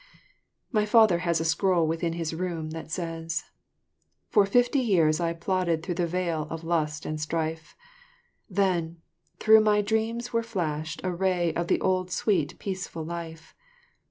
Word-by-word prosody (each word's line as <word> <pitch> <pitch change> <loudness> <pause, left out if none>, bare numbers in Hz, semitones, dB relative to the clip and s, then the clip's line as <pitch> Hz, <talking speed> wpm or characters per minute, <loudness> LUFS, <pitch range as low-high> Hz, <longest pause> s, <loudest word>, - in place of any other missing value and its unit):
My 215 -4 +2
father 215 -5 +5
has 170 -2 0
a 165 - -2
scroll 170 +1 +2
within 165 +1 -1
his 165 -1 -3
room 165 -2 -3
that 160 0 -7
says: 165 -1 -3 0.9
"For 205 -2 +4
fifty 245 +6 +3
years 170 -10 +3
I 170 -1 0
plodded 170 -1 -1
through 180 - -2
the 170 - +1
vale 170 -3 -2
of 165 0 -6
lust 155 -3 -1
and 155 0 -3
strife, 160 +1 -3 0.7
Then 180 -4 0 0.4
through 220 0 +6
my 210 -1 +3
dreams 225 +3 -1
there 230 - +1
flashed 160 -8 -3
a 185 -1 -1
ray 175 -2 +1
of 170 0 -2
the - - +2
old 185 -1 +1
sweet 180 -4 0
peaceful 185 -4 -5
life. 165 -1 -7
170 Hz, 155 wpm, -27 LUFS, 160-195 Hz, 0.9 s, through